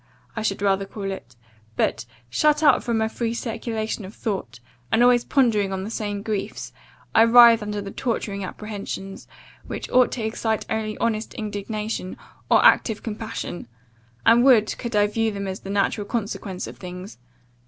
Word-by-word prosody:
I 225 - -2
should 200 -2 -1
rather 195 0 +1
call 195 -1 -5
it; 125 -10 -9 0.4
but, 110 +2 0 0.2
shut 300 - +2
up 285 -4 +5
from 230 -2 -1
a 220 - +2
free 230 +1 -3
circulation 225 -2 -3
of 195 +3 -10
thought, 195 - -4 0.3
and 235 - +4
always 245 -1 +5
pondering 220 -7 +2
on 190 0 -3
the 210 - -6
same 205 -2 -3
griefs, 210 -3 -4 0.4
I - - +6
writhe 235 -1 +8
under 210 0 -3
the 200 0 -7
torturing 205 -5 -3
apprehensions, 195 -1 -6 0.4
which - - -5
ought 250 0 +4
to 230 -3 -3
excite 220 0 -1
only 215 -1 -2
honest 225 -1 -2
indignation, 210 -2 -4 0.3
or - - +5
active 220 -3 +4
compassion; 220 - -5 0.6
and 235 +1 +6
would, 235 -5 +5
could 235 -2 -4
I 205 0 +5
view 225 +2 0
them 200 -2 -4
as 190 0 -4
the 195 - -10
natural 200 +1 0
consequence 205 -4 -3
of - - -10
things. 180 -6 -9
215 Hz, 165 wpm, -23 LUFS, 200-230 Hz, 0.6 s, writhe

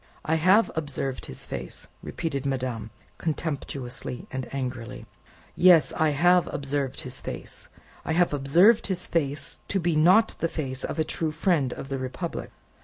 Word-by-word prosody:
"I 160 - +1
have 185 +7 +4
observed 145 -4 -3
his 65 - -6
face!" - - -5 0.2
repeated 140 -5 -3
madame, 125 -5 -2 0.3
contemptuously 140 -6 -3
and 130 -1 -5
angrily. 125 -3 -5 0.5
"Yes. 175 -3 +6
I 160 0 +2
have 175 +5 +3
observed 140 -1 -2
his 130 0 -6
face. - - -5 0.4
I 160 - -1
have 175 -1 +3
observed 175 +12 +5
his 185 -2 -1
face 145 -3 -1
to 195 - 0
be 170 -2 +1
not 185 +9 +5
the 165 - +1
face 130 -5 -3
of - - -3
a 160 - +2
true 160 0 -2
friend 155 -4 +1
of 135 - -8
the 135 -1 -2
Republic. 130 +7 -4
145 Hz, 155 wpm, -26 LUFS, 130-170 Hz, 0.5 s, Yes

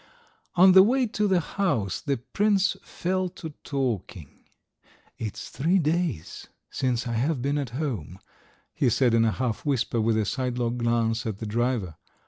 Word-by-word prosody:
On 185 +2 +7
the 190 +1 +9
way 250 +6 +3
to 210 -2 0
the 190 -2 +3
house 145 - -1
the 140 -1 -1
prince 195 - +1
fell 185 +1 -2
to 160 -3 -6
talking. 115 - -4 0.7
"It's 110 -3 -5
three 170 +7 +1
days 165 - -1 0.2
since 125 -2 -1
I 120 - -3
have 135 +5 0
been 140 +2 0
at 140 -4 -3
home," 110 - -4 0.6
he - - +2
said 120 +1 +2
in 115 0 +4
a 110 - +2
half 120 -1 -2
whisper, 125 -5 0
with 110 0 +2
a 110 - +1
sidelong 125 0 -2
glance 115 0 0
at 105 -3 -3
the 110 - -6
driver. 110 -6 -1
125 Hz, 160 wpm, -26 LUFS, 115-170 Hz, 0.7 s, the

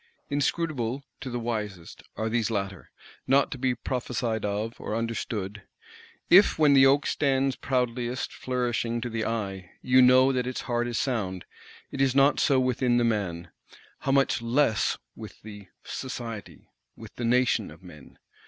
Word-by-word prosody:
Inscrutable, 140 -3 -1 0.2
to 130 - -6
the 120 - -3
wisest, 105 -7 -5 0.2
are 110 - -1
these 115 -1 0
latter; 100 -4 -4 0.4
not 135 +1 +3
to 135 - -5
be 130 -1 +1
prophesied 120 -4 -3
of, 105 +3 -2
or 105 - -3
understood. 110 -3 -3 0.7
If 195 +4 +6
when 150 -2 +5
the 135 -1 +7
oak 140 +2 +3
stands 135 -2 +1
proudliest 125 0 -2
flourishing 120 -2 -2
to 120 0 -4
the 110 -1 -2
eye, 100 -5 -3
you 130 0 +5
know 130 +1 +6
that 125 -1 -1
its 130 - -3
heart 120 0 -1
is 120 -2 -3
sound, 95 -9 -2 0.5
it 135 - -3
is 135 -1 +2
not 140 +1 +4
so 135 -3 +3
with 130 -1 0
the 130 - +1
man; 105 -9 0 0.5
how 135 - -1
much 135 -3 +2
less 115 -1 +1 0.2
with - - -10
the 105 -2 -10 0.2
Society, 115 -6 -7 0.3
with 110 -1 -12
the 120 - -4
Nation 125 +1 +2
of - - -15
men! - - -14
120 Hz, 160 wpm, -27 LUFS, 110-130 Hz, 0.7 s, the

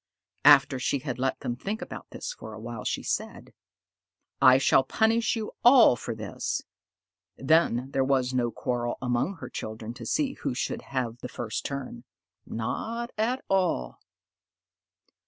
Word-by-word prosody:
After 140 -2 +7
she 135 - 0
had 130 -2 -5
let 135 +1 -1
them 120 - -2
think 205 - -4
about 265 - -8
this - - -6
for - - -10
a - - -9
while, - - -6
she - - -2
said, - - -4 0.9
"I - - +8
shall - - +4
punish 225 +2 +2
you 220 -2 -4
all 245 - +8
for 115 0 -5
this." 110 -2 -3 0.7
Then 135 -3 +2
there 135 - +1
was 130 -1 +1
no 120 -2 +1
quarrel 120 0 -2
among 125 +9 -1
her 165 - -8
children 110 +1 -6
to 120 -2 -8
see 275 -3 0
who 140 - -4
should 130 - -2
have 120 -3 -3
the 125 - -7
first 115 -3 -4
turn 140 - -5 0.4
not 230 - -3
at 240 +5 -1
all. 180 - 0
135 Hz, 155 wpm, -27 LUFS, 120-200 Hz, 0.9 s, I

